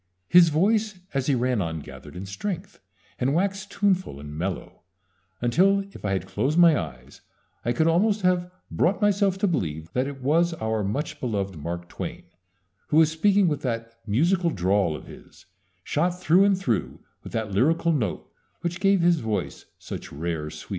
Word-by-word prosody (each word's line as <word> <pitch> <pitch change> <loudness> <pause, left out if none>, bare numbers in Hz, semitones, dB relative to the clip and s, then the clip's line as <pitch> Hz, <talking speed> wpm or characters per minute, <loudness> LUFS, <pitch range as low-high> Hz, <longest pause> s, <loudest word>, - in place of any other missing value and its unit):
His 175 -1 +7
voice 210 +6 +1 0.2
as 135 -2 -1
he 140 - +3
ran 125 -2 +1
on 80 -2 -3
gathered 65 +1 -11
in 90 +2 -6
strength, 160 - -5 0.4
and 135 +3 +1
waxed 195 +2 -1
tuneful 190 - 0
and 75 +1 -8
mellow, 90 +3 -4 0.6
until, 185 +12 +3
if - - -13
I 100 -2 0
had 95 - -2
closed 150 +5 -1
my 170 -2 +7
eyes, 65 - -6 0.4
I 120 - 0
could 140 +7 +1
almost 200 +5 +2
have 180 -1 +2 0.2
brought 185 +4 +1
myself 200 -2 +2
to 200 - +1
believe 80 - -2
that 130 +2 0
it 140 -1 -7
was 165 +5 +2
our 110 -6 -1
much 150 +9 -3
loved 100 -6 -2
Mark 85 +3 -5
Twain - - -6 0.6
who 150 - +1
was 160 -1 +6
speaking 195 +4 +3
with 150 -3 -1
that 115 -3 -4
musical 170 - +2
drawl 95 - +1
of - - -9
his, - - -15 0.4
shot 175 - 0
through 180 +3 +5
and 200 -2 +3
through 120 - -2 0.2
with - - -10
that 110 -2 -2
lyrical 165 - +2
note 115 - -1 0.3
which 175 0 -3
gave 195 -1 +3
his 170 -1 +4
voice 110 -5 -3
such - - -8
rare 80 0 -3
sweetness. 75 0 -11
145 Hz, 175 wpm, -25 LUFS, -, 0.6 s, His